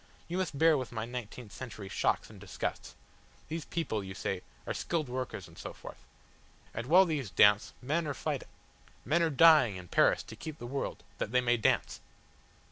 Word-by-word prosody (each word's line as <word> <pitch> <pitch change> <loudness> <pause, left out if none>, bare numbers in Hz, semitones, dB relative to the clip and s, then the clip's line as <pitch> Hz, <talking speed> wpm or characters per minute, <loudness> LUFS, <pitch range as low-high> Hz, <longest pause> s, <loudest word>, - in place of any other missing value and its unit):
You 175 - -3
must 170 -6 -2
bear 160 -1 +5
with 130 - -5
my 110 -2 -3
nineteenth 120 -2 -7
century 110 -6 -8
shocks 95 - 0
and - - -13
disgusts. - - -5 0.5
These 160 0 -4
people, 135 -11 -2
you 95 0 -7
say, 95 -1 -3 0.2
are - - -2
skilled 160 -4 -2
workers 130 0 -4
and - - -15
so - - -6
forth. - - -11 0.7
And 115 +2 -4
while 180 +6 +7
these 150 - -2
dance, 105 +4 +5
men 155 +5 0
are 145 - -2
fighting - - -3 0.6
men 155 +7 +2
are 165 - +3
dying 155 - +6
in 90 -1 -9
Paris - - +4
to - - -10
keep 155 -1 -7
the 120 - -8
world 135 +3 -4 0.2
that - - -2
they 125 - +4
may 120 -1 +3
dance." 110 - +1
130 Hz, 190 wpm, -31 LUFS, 110-160 Hz, 0.7 s, while